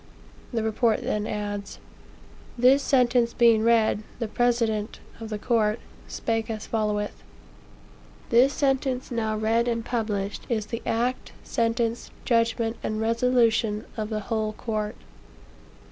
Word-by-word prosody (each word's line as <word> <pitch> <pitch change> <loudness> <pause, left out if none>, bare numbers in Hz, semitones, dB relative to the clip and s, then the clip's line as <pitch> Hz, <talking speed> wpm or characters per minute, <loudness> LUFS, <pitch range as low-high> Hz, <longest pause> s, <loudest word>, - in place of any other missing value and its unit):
The 230 -3 -1
report 220 +1 +1
then 210 0 -1
adds: 205 -1 -4 0.8
"This 255 +4 +5
sentence 245 -3 +3
being 230 -2 +5
read, 225 -2 +3 0.2
the 230 - -2
president 230 -2 0 0.2
(of 225 -1 -7
the 215 - -3
court) 215 0 +1 0.3
spake 225 0 -2
as 220 -1 -4
followeth: 210 -2 -2 1.1
'This 245 +4 +6
sentence 270 -2 0
now 220 -2 -1
read 225 +2 +1
and 230 -1 -1
published, 210 -4 -2
is 220 -3 0
the 230 +2 -5
act, 245 +3 -1
sentence, 230 0 -1 0.2
judgment 230 -1 +1
and 215 0 -2
resolution 230 -2 +2
of 215 -1 -3
the 215 -1 -2
whole 215 0 -2
court.' 215 -1 -3
225 Hz, 125 wpm, -26 LUFS, 215-235 Hz, 1.1 s, This